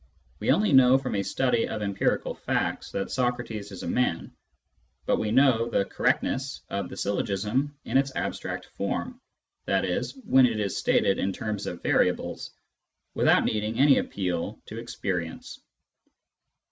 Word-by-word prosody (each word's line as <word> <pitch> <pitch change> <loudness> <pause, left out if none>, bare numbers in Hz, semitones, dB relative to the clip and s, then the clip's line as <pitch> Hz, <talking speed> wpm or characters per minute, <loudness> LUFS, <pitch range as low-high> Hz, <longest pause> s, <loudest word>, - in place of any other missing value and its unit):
We - - -2
only 210 -6 +3
know 130 0 +7
from 135 -1 -4
a 100 - +1
study 125 +3 +1
of 105 -1 -4
empirical 100 -1 0
facts - - -2
that 100 - -3
Socrates 120 -5 -2
is 95 - -8
a - - -4
man, 85 -3 -1 0.7
but - - +2
we 110 - -1
know 120 -1 +4
the 100 - +1
correct - - +1
ness 135 +1 -3
of 100 0 -2
the - - -9
syllogism 105 +8 -1
in 135 - +3
its 135 0 0
abstract - - -3
form 245 - -3 0.5
{i.e. - - +1 0.2
when 130 -6 +6
it 115 -3 -2
is 100 -2 -1
stated 95 - +2
in 95 - 0
terms 105 0 -4
of 85 - -6
variables) - - 0 0.6
without - - +4
needing 110 +1 -1
any 140 0 +6
appeal 95 +2 -3
to 110 - -7
experience. 90 -7 -4
110 Hz, 150 wpm, -27 LUFS, 100-130 Hz, 0.7 s, know